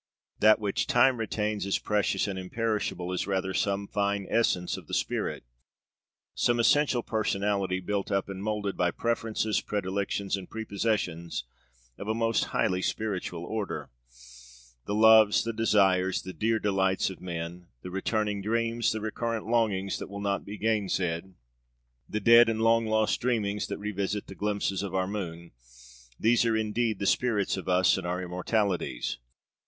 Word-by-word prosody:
That 110 0 +6
which 105 -2 -1
Time 130 0 +4
retains 105 -2 -2
as 100 - +1
precious 105 0 0
and 95 -2 -3
imperishable 100 -2 -2
is 90 - -2
rather 95 -1 -1
some 100 +1 0
fine 100 -1 -1
essence 90 -6 +1
of - - -10
the - - -2
spirit, - - -2 0.9
some 120 0 +1
essential 125 +1 +3
personality 100 -3 0
built 100 +2 -3
up 100 -1 0
and 95 -1 -6
moulded 105 -1 -2
by 90 - +2
preferences, 110 +1 -1
predilections, 100 0 -2
and 95 -2 -8
prepossessions 100 - -2 0.6
of 100 - -6
a 110 - 0
most 115 -1 +1
highly 90 0 0
spiritual 95 -5 -3
order. 105 - -4 1.0
The 100 - -1
loves, 110 -1 +6
the 115 - -3
desires, 95 -4 +2
the 95 - -7
dear 110 +3 +1
delights 95 -2 +1
of 95 - -11
men; 85 0 -6 0.2
the 90 - -7
returning 105 +1 -1
dreams, 115 +2 0
the 110 - -3
recurrent 115 +1 -3
longings 105 -4 0
that - - -7
will 100 0 -6
not 100 -1 -1
be 105 +1 -7
gainsaid; 95 -5 -1 0.7
the 105 - -1
dead 115 +2 +7
and 110 0 -1
long 115 0 +4
lost 110 0 +1
dreamings 105 -4 0
that - - -4
revisit 100 0 -3
the - - -9
glimpses 100 -1 -1
of 100 -2 -4
our 95 -1 +1
moon 85 -4 -5 0.7
these 115 +1 +4
are 115 -1 +2
indeed 110 0 0
the 100 - -3
spirits 105 -3 +1
of 95 -1 -5
us, 90 +1 +4
and 90 - -5
our 90 +1 -2
immortalities. 90 - -1
100 Hz, 155 wpm, -28 LUFS, 95-110 Hz, 1.0 s, dead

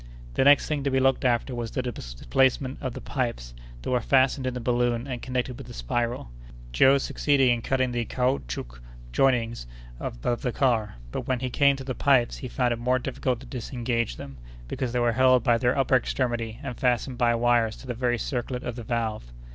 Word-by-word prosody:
The - - +2
next 140 +1 +6
thing 150 -2 -1
to 140 - +1
be 130 0 +2
looked 135 +1 +2
after 125 +1 +1
was 120 -2 -3
the 130 - -3
displacement 130 - 0
of 130 -3 -3
the - - -6
pipes 115 - -3 0.3
that - - -3
were 125 -1 +2
fastened 130 +1 +2
in 125 - -2
the - - -3
balloon 120 0 0
and 125 -3 -5
connected 125 0 -3
with 135 - -9
the - - -9
spiral. 115 - -2 0.4
Joe 135 - +5
succeeded 135 -1 +2
in 120 -1 +2
cutting 130 +1 0
the 120 -1 -1
caoutchouc 60 - -2 0.3
jointings 115 - +1 0.3
above 115 - -3
the 125 - -1
car, 115 - +1 0.2
but - - -4
when 130 -1 0
he 130 0 -3
came 140 +1 +4
to 135 - -7
the 130 0 -3
pipes 130 -3 +2
he 130 - -6
found 125 -1 0
it 115 - -5
more 125 +2 +2
difficult 125 -1 -2
to - - -11
disengage 120 - -2
them, 70 +2 -9 0.3
because 125 - -3
they 125 - -1
were 120 -1 +3
held 130 0 +4
by 120 -1 +3
their 125 +2 +1
upper 135 -1 +4
extremity 120 -3 -2
and 125 - -6
fastened 125 0 0
by 120 -1 +3
wires 115 -2 +2
to - - -13
the 125 - -3
very 120 0 0
circlet 125 +1 -3
of 125 - -4
the 120 - -7
valve. 110 - -3
125 Hz, 210 wpm, -26 LUFS, 115-130 Hz, 0.4 s, next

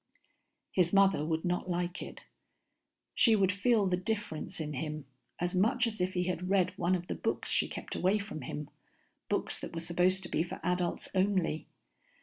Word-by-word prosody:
His 175 -2 +3
mother 195 -6 +4
would 160 +2 -1
not 180 +1 -1
like 175 0 -1
it. - - -8 0.9
She 225 -3 +5
would 195 -2 +3
feel 205 +1 +3
the 185 -1 +2
difference 205 -6 -3
in 150 -1 -3
him, 150 +1 -4 0.3
as 175 0 -1
much 225 +7 +3
as 220 -4 -3
if 185 +1 0
he 180 - +2
had 180 0 -2
read 185 -2 +2
one 175 +2 +2
of 175 -1 -4
the - - -3
books - - -2
she - - +3
kept - - -6
away 190 +3 +2
from 205 -7 -6
him, 145 +3 -6 0.6
books - - 0
that - - -7
were - - -1
supposed 180 +3 +2
to 175 - -4
be - - +1
for 170 - -4
adults 180 0 0
only. 185 -5 +1
180 Hz, 185 wpm, -31 LUFS, 170-195 Hz, 0.9 s, She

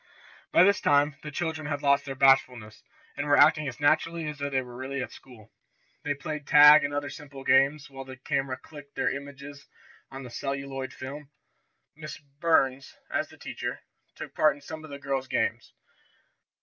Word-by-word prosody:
By - - +6
this 200 +2 +3
time 145 0 +3
the 150 - -7
children 160 0 -3
had 145 -1 -3
lost 140 0 +3
their 135 -1 -5
bashfulness, 130 -5 +2 0.3
and 145 - -3
were 145 - +4
acting 150 0 +5
as 120 -2 -6
naturally 160 +2 +1
as 150 -1 -6
though 140 0 -2
they 135 -1 0
really 130 +3 -7
were 130 - -1
at - - -8
school. 115 -5 -16 0.5
They 145 -1 -1
played 150 0 -6
tag 150 +1 +8
and 140 - -1
other 145 0 -3
simple 140 -3 -10
games, 140 +2 +3
while 135 -1 -9
the 130 -1 -11
camera 135 0 -2
clicked 145 0 -14
their - - 0
images 140 0 -10 0.4
on 135 0 -8
the 125 - -10
celluloid 135 0 -4
film. 140 +2 -9 0.7
Miss 155 0 -8
Burns, 140 -2 0 0.2
as - - -1
the - - -16
teacher, - - -6 0.3
took - - -9
part 155 -2 +3
in 145 - -16
some 155 +2 -8
of 155 - -11
the 140 - -7
girls' 135 -2 -3
games. - - -1
140 Hz, 185 wpm, -27 LUFS, 135-150 Hz, 0.7 s, tag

